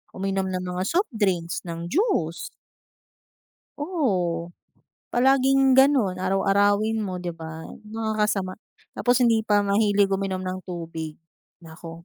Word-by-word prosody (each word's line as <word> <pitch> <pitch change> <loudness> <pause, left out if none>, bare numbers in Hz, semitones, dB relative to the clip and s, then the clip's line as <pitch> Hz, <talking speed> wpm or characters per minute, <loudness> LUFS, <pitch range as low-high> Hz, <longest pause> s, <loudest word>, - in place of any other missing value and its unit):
uminom 195 0 -1
ng 185 0 -3
mga 180 0 -3
soft 360 -1 0
drinks, 180 -5 0
ng 170 0 -5
juice. 185 - 0 1.3
Oo, 185 - -1 0.5
palaging 270 +1 +3
gano'n, 260 -9 +4
araw-arawin 205 +3 +2
mo, 190 -4 -3
di 175 -1 -4
ba, 160 -1 -8 0.2
nakakasama. 215 -3 -1 0.4
Tapos 245 0 +1
hindi 230 -2 +4
pa 210 -2 +2
mahilig 200 -1 +2
uminom 190 -1 -1
ng 185 0 -3
tubig, 165 -3 -6 0.5
naku. 165 +1 -11
195 Hz, 115 wpm, -24 LUFS, 175-225 Hz, 1.3 s, gano'n